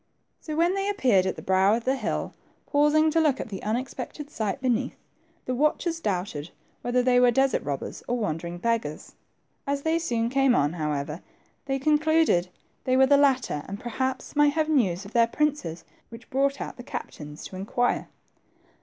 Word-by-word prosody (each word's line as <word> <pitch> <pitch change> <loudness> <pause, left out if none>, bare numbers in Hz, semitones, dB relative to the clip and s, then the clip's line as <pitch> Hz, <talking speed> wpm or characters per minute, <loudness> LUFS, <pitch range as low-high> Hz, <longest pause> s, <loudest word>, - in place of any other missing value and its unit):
So 310 - -6
when 340 +3 +3
they 390 +1 -1
appeared 245 - +3
at 185 - -1
the - - -9
brow 190 +2 +4
of 230 - -3
the 265 +2 +1
hill, 225 -5 -3 0.3
pausing 300 +2 +3
to 330 - +2
look 290 -4 +2
at - - -5
the 195 -3 -6
unexpected 255 +6 -4
sight 220 -2 -2
beneath, 255 -1 0 0.5
the 255 - -1
watchers 305 +5 0
doubted 180 - -3 0.3
whether 245 +1 +1
they 245 0 +4
were 250 0 +6
desert 270 +1 +2
robbers, 140 -2 -4
or 245 - 0
wandering 170 -4 -3
beggars. 230 -7 -2 0.5
As 280 0 -1
they 320 +1 +1
soon 235 -8 -1
came 270 -2 +3
on, 145 +2 +2
how 155 -3 -2
ever, 150 +3 -3 0.5
they 270 0 0
concluded 305 - +3 0.3
they 255 0 +2
were 265 - +7
the 285 +2 +5
latter, 260 - +2
and 200 +1 -6
per 240 - -6
haps 260 +4 -3
might 295 0 +4
have. 315 0 0
news 200 - +1
of 200 - -11
their 235 -1 +4
princes, 285 - -1 0.2
which 230 0 -13
brought 275 +1 +1
out - - -6
the - - -7
captains 150 -9 -7
to - - -8
inquire. 215 +6 0
250 Hz, 185 wpm, -26 LUFS, 195-285 Hz, 0.5 s, were